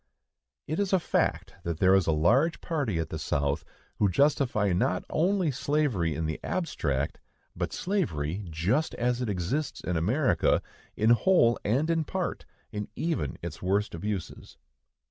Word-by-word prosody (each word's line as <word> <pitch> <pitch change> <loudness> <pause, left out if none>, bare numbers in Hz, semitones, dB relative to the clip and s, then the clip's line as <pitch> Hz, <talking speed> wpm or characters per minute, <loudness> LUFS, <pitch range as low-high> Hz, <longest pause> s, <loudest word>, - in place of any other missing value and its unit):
It 155 +5 -2
is 200 -1 0
a 190 - +5
fact - - -1
that 85 -2 -3
there 95 +2 +5
is 95 -2 +4
a - - +4
large 125 - +3
party 140 - -1
at 80 -1 -2
the 80 - -4
South 70 +1 0 0.4
who 105 - +4
justify 120 - +2
not 90 +1 0
only 180 0 +2
slavery 130 - 0
in 80 +2 -2
the 80 0 -3
abstract, 75 - -2 0.4
but - - -2
slavery 100 - -1
just 95 - 0
as 125 +1 0
it 120 - -1
exists 105 - -2
in 90 - -2
America, 125 - +2 0.3
in 110 +2 +4
whole 120 - +4
and 130 +9 +1
in 165 -1 +1
part, - - -3 0.3
and 105 -1 -3
even 155 - -2
its 85 -1 -6
worst 100 +3 0
abuses. 95 +1 -5
105 Hz, 155 wpm, -28 LUFS, -, 0.4 s, a